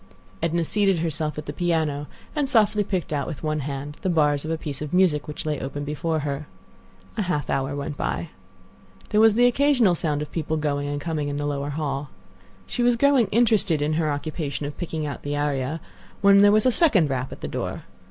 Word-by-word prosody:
Edna 165 +1 +1
seated 195 +2 +2
herself 160 -2 -2
at 150 - -5
the 145 - -5
piano, 155 -4 0 0.3
and 290 -3 +2
softly 215 -4 +4
picked 185 -5 -3
out 140 -2 -1
with 150 - -6
one 155 0 0
hand 145 +1 -5
the 190 - -1
bars 150 -4 +2
of 155 - -5
a 165 - 0
piece 145 -3 -6
of 150 +3 -3
music 170 -6 +3
which 150 - -6
lay 150 -1 -1
open 145 +2 -4
before 155 +2 -2
her. 145 0 -4 0.7
A - - +1
half 180 -6 -1
hour 135 +1 -1
went 145 0 -4
by. 170 - -2 0.8
There 210 - +3
was 220 -1 +6
the 245 +1 +5
occasional 245 -5 +4
sound 150 -3 -1
of 150 - -10
people 160 -1 -2
going 145 -2 -1
and 145 0 -2
coming 150 -1 -2
in 145 0 -3
the 145 - -2
lower 145 -1 -2
hall. 145 -1 -3 0.6
She - - -3
was 240 0 +4
growing 270 -2 +4
interested 210 -6 +3
in 150 +1 0
her 155 -1 +1
occupation 145 -1 -3
of 145 0 -5
picking 160 -3 -4
out 145 - -5
the 145 0 -3
aria, 145 +1 -1 0.4
when 200 0 +7
there 205 0 +7
was 215 +2 +4
a 255 - +5
second 205 - +3
rap 130 -1 -2
at - - -9
the - - -4
door. - - -4
155 Hz, 215 wpm, -24 LUFS, 145-190 Hz, 0.8 s, when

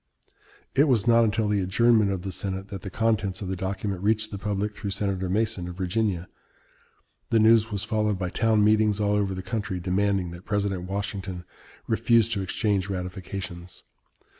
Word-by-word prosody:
It 140 +2 +5
was 120 -8 +2
not 115 -1 +5
until 110 0 +1
the 105 -1 +1
adjournment 110 +3 +3
of 95 -2 -2
the 95 - -4
Senate 95 +1 -4
that 95 -1 -6
the 100 - -6
contents 105 -1 0
of 95 - -4
the 95 - -1
document 95 0 -3
reached 110 +1 +1
the 100 - -5
public 105 +1 -2
through 105 -2 -4
Senator 95 -2 -2
Mason 105 -2 0
of 90 - -7
Virginia. 95 -1 -1 1.0
The 115 - +3
news 110 0 +5
was 100 -1 -2
followed 105 -2 0
by 90 -1 -3
town 110 -2 +2
meetings 105 -1 +3
all 105 -1 +1
over 100 -2 0
the 95 - -5
country 100 -2 -3
demanding 95 0 0
that 85 +1 -10
President 100 -4 -2
Washington 95 -2 -4 0.4
refuse 115 0 +3
to 105 -4 -1
exchange 100 0 0
ratifications. 90 -1 -6
100 Hz, 175 wpm, -26 LUFS, 95-110 Hz, 1.0 s, It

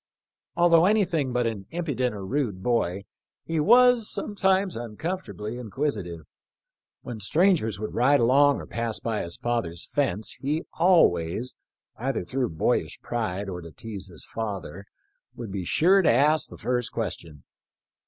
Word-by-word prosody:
Although 170 0 +5
anything 175 -10 +1
but 125 -1 0
an 105 -4 -3
impudent 140 -9 -2
or 100 -2 -6
rude 105 -6 -2
boy 100 -5 0 0.4
he 165 -1 -1
was 240 +5 +5
sometimes 190 -2 0
uncomfort 150 - -4
ably 105 +3 -5
inquisitive. 110 - -3 0.8
When 120 -3 -6
strangers 130 - +2
would 110 - -5
ride 135 +4 +4
along 140 +4 +4
or - - -7
pass 115 -1 -3
by 110 -2 -2
his 85 0 -5
father's 105 -9 -2
fence 110 -8 -1
he 150 +4 -1
always 125 - +3 0.2
— - - -68
either 130 -6 -2
through 125 +4 -1
boyish 80 - -1
pride 105 -4 -3
or 90 -2 -5
to 85 - -10
tease 100 +2 -7
his 85 -4 -10
father 100 -3 -5 0.3
— - - -38
^would 115 -4 -6
be 95 -2 -4
sure 185 - +4
to 175 - +3
ask 150 +6 +3
the - - -11
first 125 -1 -1
question. 85 - -5
120 Hz, 155 wpm, -26 LUFS, 100-155 Hz, 0.8 s, Although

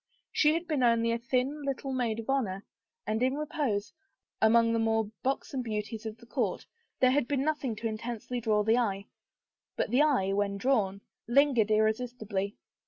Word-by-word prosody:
She 305 +1 +3
had 340 +1 -3
been 305 -5 0
only 230 -1 +3
a 230 - 0
thin 255 +5 -1
little 275 -1 -3
maid 240 -4 0
of 225 - -14
honor, 210 -8 -1 0.4
and 215 +2 -1
in 260 +2 +2
repose, 275 -9 -2 0.5
among 230 +1 +5
the 230 - +1
more 225 -1 +1
buxom 270 0 -2
beauties 220 -1 -4
of 220 0 -7
the 235 - -16
court, - - -2 0.4
there 255 -1 +6
had 265 -2 +2
been 275 -1 0
nothing 290 -6 -1
to 225 +2 -3
intensely 235 +2 -4
draw 215 -2 +2
the 225 +3 +3
eye. 200 -4 -1 0.7
But - - -1
the 255 +4 +4
eye, 255 -11 +2
when 200 0 0
drawn, 200 -4 +1 0.3
lin 280 +4 +4
gered 220 -3 +2
irresistibly. 220 -2 0
230 Hz, 175 wpm, -29 LUFS, 215-265 Hz, 0.7 s, there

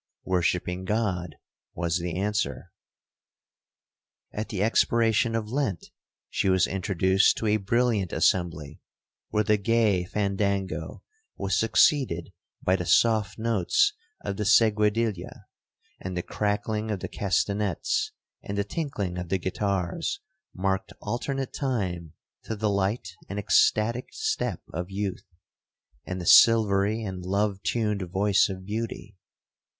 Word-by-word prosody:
—'Worshipping 90 0 0
God,' 95 -6 -1 0.4
was 85 0 0
the 85 0 -3
answer. 105 +2 -2 1.6
'At 105 +1 -4
the 100 -2 -1
expiration 115 0 +2
of 110 -2 -2
Lent, 125 - -2 0.4
she 95 - 0
was 95 -1 +4
introduced 95 0 +2
to - - -3
a 105 0 +3
brilliant 110 -2 +1
assembly, 80 -5 0 0.5
where 105 - +1
the 105 0 +3
gay 105 -3 +2
fandango 100 -1 -2 0.3
was 95 -1 -1
succeeded 110 - +2 0.3
by 90 - +3
the 90 -2 -3
soft 110 +2 +3
notes 410 - +2 0.3
of 100 - -3
the 105 - -1
seguedilla,—and 105 -4 0
the 90 - -2
crackling 105 +1 -2
of 105 -4 -2
the - - -3
castanets, 105 - -1 0.3
and 100 - -5
the 100 - +1
tinkling 100 - -3
of 90 -1 -6
the 95 - +1
guitars, 100 - -2 0.3
marked 95 0 -2
alternate 135 +2 -3
time 95 - -2 0.3
to 110 - -3
the 105 0 0
light 95 -1 -1
and 100 - -4
ecstatic 110 +4 +2
step 435 0 -2
of 90 +1 -4
youth, 100 0 -4 0.8
and 90 0 -4
the 90 - -5
silvery 110 +1 +5
and 95 -3 -5
love 100 +1 0
tuned 105 -3 -1
voice 100 +2 +3
of 95 -1 -7
beauty. 105 -1 -5
100 Hz, 125 wpm, -26 LUFS, 95-110 Hz, 1.6 s, silvery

